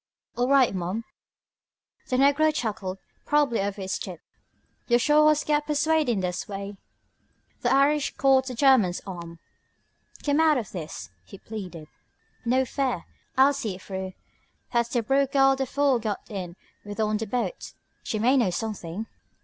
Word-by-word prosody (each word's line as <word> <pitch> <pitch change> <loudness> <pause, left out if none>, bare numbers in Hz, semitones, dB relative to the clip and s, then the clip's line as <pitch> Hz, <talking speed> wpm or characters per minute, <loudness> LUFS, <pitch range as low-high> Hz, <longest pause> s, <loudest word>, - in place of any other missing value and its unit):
"All 245 +1 +1
right, 270 -4 +4
ma'am." 185 +5 -3 1.1
The 255 - +1
negro 285 +4 +4
chuckled, 205 -9 -3 0.3
probably 290 -7 +2
over 200 +1 -3
his 190 - -2
tip. 180 -4 -7 0.7
"Yo' 240 - +5
sho' 300 +5 +4
has 305 -1 +3
got 295 0 0
the 300 - 0
p'suadin'est 265 - +1
way...." 200 0 -6 0.9
The 245 - +1
Irishman 280 +2 +2
caught 265 -1 +4
the 255 - -4
German's 230 -9 +4
arm. 170 -3 -8 0.9
"Come 290 +1 +2
out 315 -2 +5
of 230 -5 -4
this," 165 -4 -7
he 195 - -12
pleaded. 185 -8 -8 0.6
"No 255 +2 +2
fear. 260 -1 -2 0.3
I'll 270 +2 +6
see 220 -8 -3
it 185 - -13
through. 190 -1 -5 0.6
That's 235 -1 +2
the 240 -2 0
Brooke 270 +3 +1
girl 270 -1 +5
the 270 0 -2
fool 280 -2 +2
got 215 -3 -3
in 180 -4 -5 0.3
with 205 +1 -8
on 215 -1 +1
the 220 +1 -4
boat. 250 - -3 0.3
She 220 - -3
may 245 +5 +3
know 235 -7 +3
something...." 200 0 -4
240 Hz, 155 wpm, -26 LUFS, 195-275 Hz, 1.1 s, I'll